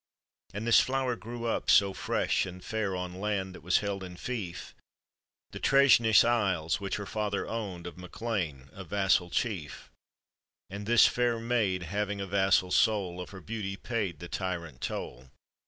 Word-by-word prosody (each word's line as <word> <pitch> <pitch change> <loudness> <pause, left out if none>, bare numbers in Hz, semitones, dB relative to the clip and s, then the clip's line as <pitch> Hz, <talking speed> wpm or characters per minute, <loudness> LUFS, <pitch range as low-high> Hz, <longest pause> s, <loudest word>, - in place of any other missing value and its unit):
And 105 +3 -5
this 115 - +6
flower 130 -2 0
grew 120 +1 -7
up 115 - -1
BO 100 -1 -4
fresh - - 0
and 90 0 -10
fair 105 -4 -2
On 90 0 -5
land 100 -3 -1
that - - -11
was 90 - +2
held 100 -1 -3
in 90 -1 -8
flef, 100 -3 -5 0.4
« - - -53
The - - -7
Treshnish 130 -5 +6
Isle?, 95 -9 +1
which 100 -1 -3
her 100 - -4
father 100 0 -2
owned 100 -7 -5
Of 90 +1 -8
MacLean, 90 - -4
a 95 - -8
vasfal 95 -1 +1
chief, 95 -11 -3 0.8
And 100 +1 -6
this 120 0 +7
fair 120 -1 +1
maid, 110 -6 0
having 100 +3 -2
a 100 - -3
vassal 95 -1 +2
soul, 95 -6 +2
Of 90 - -8
her 95 -2 -10
beauty 105 -1 -4
paid 105 -9 -3
the 85 - -8
tyrant 85 -8 -4
toll. 65 +2 -5
100 Hz, 170 wpm, -29 LUFS, 90-110 Hz, 0.8 s, this